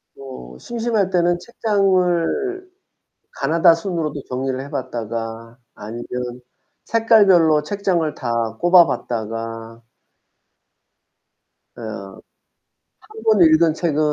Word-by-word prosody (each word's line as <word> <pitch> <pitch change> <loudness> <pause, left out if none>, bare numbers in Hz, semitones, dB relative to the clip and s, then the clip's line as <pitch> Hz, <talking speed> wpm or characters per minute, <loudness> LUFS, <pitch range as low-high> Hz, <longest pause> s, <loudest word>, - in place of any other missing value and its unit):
뭐. 95 - -10
심심할 230 -4 -1
때는 175 -1 +1
책장을 205 - 0 0.6
가나다순으로도 165 0 +1
정리를 130 +1 -3
해 140 +1 -8
봤다가 115 -3 -5 0.2
아니면 110 +3 -8 0.8
색깔별로 195 -9 +4
책장을 175 -3 -1
다 115 -2 -2
꽂아 175 0 +6
봤다가. 115 -1 -5 1.9
어. 100 -4 -8 0.9
1 435 +1 -12
번 215 -3 +3
읽은 160 0 +5
책은 160 -3 -1
160 Hz, 190 characters per minute, -20 LUFS, 115-190 Hz, 1.9 s, 꽂아